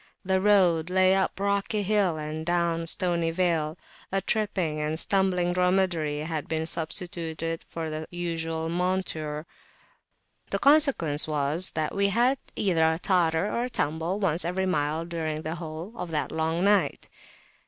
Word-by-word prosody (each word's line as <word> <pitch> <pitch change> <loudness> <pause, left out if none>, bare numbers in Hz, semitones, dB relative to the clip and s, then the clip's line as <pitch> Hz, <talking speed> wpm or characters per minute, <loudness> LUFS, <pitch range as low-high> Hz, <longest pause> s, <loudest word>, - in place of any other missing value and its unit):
The 190 0 +1
road 180 -5 +3
lay 185 0 +4
up 190 0 0
rocky 200 +1 0
hill 200 -5 +1
and 155 +1 -5
down 170 -1 0
stony 170 -2 +1
vale; 165 -2 0 0.3
a 195 - +1
tripping 190 -6 -1
and 155 +1 -1
stumbling 185 -2 +1
dromedary 180 -5 +1
had 155 -2 -4
been 160 +1 -2
substituted 165 0 -2
for 160 -1 -5
the 155 +1 -4
usual 165 -2 -3
monture: 165 -4 -2 1.0
the - - 0
consequence 275 - +5
was 155 +4 +2
that 155 -1 -1
we 200 0 +2
had 245 +6 +2 0.2
either 165 -5 +2
a - - -3
totter 170 -2 +1
or 235 +3 -1
a - - -4
tumble 160 +1 -2
once 175 -4 +1
per 180 +3 -1
mile 160 -2 -1
during 160 -2 -4
the 155 - -3
whole 160 +6 -7
of 180 -6 -6
that 155 -2 -2
long 160 +2 -1
night. 205 0 +2
170 Hz, 150 wpm, -26 LUFS, 160-190 Hz, 1.0 s, consequence